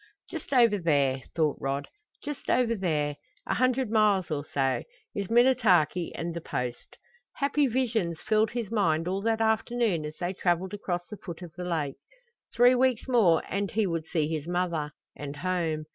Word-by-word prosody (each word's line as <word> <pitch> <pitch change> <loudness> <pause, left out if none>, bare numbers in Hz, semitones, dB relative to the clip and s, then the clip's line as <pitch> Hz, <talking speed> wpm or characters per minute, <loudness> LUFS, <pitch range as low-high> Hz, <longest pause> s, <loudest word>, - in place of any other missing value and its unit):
Just - - -7
over 235 -6 +4
there, 140 -6 +2
thought 155 -4 +1
Rod 140 +1 -2 0.4
just 295 -1 -6
over 240 -2 +3
there 150 -8 -1 0.3
a - - -1
hundred 255 -2 +1
miles 210 -5 +3
or 145 -2 -1
so, 135 -2 0 0.3
is 200 -2 -3
Minnetaki 225 - +3
and 170 +1 -3
the 170 - -5
Post! 125 -5 -5 0.4
Happy 285 0 +2
visions 225 -9 0
filled 215 0 +2
his 235 -4 -4
mind 165 -7 +1
all 190 +2 -1
that 225 +1 0
afternoon 220 -5 +1
as 150 0 -6
they 180 +1 -2
traveled 180 +1 0
across 175 -4 -3
the 210 - -8
foot 175 -1 -8
of 170 -3 -10
the 180 0 -6
lake. 155 -6 -2 0.5
Three 245 +2 +5
weeks 255 -1 +1
more 215 -11 +4
and 200 0 -2
he 220 0 +1
would 165 -3 -2
see 155 -3 0
his 155 -1 -3
mother 175 -4 -1 0.3
and 145 0 -6
home. 165 -2 -1
180 Hz, 175 wpm, -28 LUFS, 160-225 Hz, 0.5 s, Three